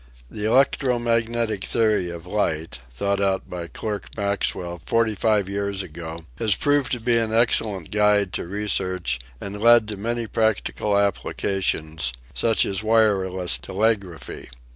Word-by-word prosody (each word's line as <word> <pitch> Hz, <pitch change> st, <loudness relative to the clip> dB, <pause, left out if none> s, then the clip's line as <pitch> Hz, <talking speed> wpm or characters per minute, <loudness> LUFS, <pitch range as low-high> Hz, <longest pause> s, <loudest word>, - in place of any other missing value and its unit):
The 105 Hz, -, -4 dB
electro 130 Hz, +1 st, +3 dB
magnetic 115 Hz, -3 st, 0 dB
theory 110 Hz, -6 st, +2 dB
of 85 Hz, 0 st, -8 dB
light, 80 Hz, -8 st, -2 dB
thought 100 Hz, +11 st, -1 dB
out 95 Hz, -1 st, 0 dB
by 85 Hz, -2 st, -6 dB
Clerk 100 Hz, -3 st, -5 dB
Maxwell 95 Hz, -4 st, -2 dB
forty 115 Hz, -1 st, +1 dB
five 105 Hz, -1 st, +1 dB
years 100 Hz, 0 st, -2 dB
ago, 80 Hz, 0 st, -8 dB
has 110 Hz, -4 st, +3 dB
proved 145 Hz, +2 st, +1 dB
to 125 Hz, -, -1 dB
be 115 Hz, 0 st, +2 dB
an 110 Hz, -1 st, -1 dB
excellent 110 Hz, -6 st, +1 dB
guide 105 Hz, -2 st, +2 dB
to -, -, -3 dB
research 95 Hz, -8 st, -1 dB, 0.2 s
and 100 Hz, +1 st, -6 dB
led 115 Hz, -1 st, +6 dB
to 105 Hz, -, -5 dB
many 115 Hz, +3 st, -2 dB
practical 110 Hz, -1 st, 0 dB
applications, 90 Hz, -7 st, -1 dB, 0.2 s
such 115 Hz, -1 st, +2 dB
as 95 Hz, -1 st, -1 dB
wireless 100 Hz, -5 st, +2 dB
telegraphy. 95 Hz, -, -2 dB
100 Hz, 140 wpm, -23 LUFS, 90-110 Hz, 0.2 s, led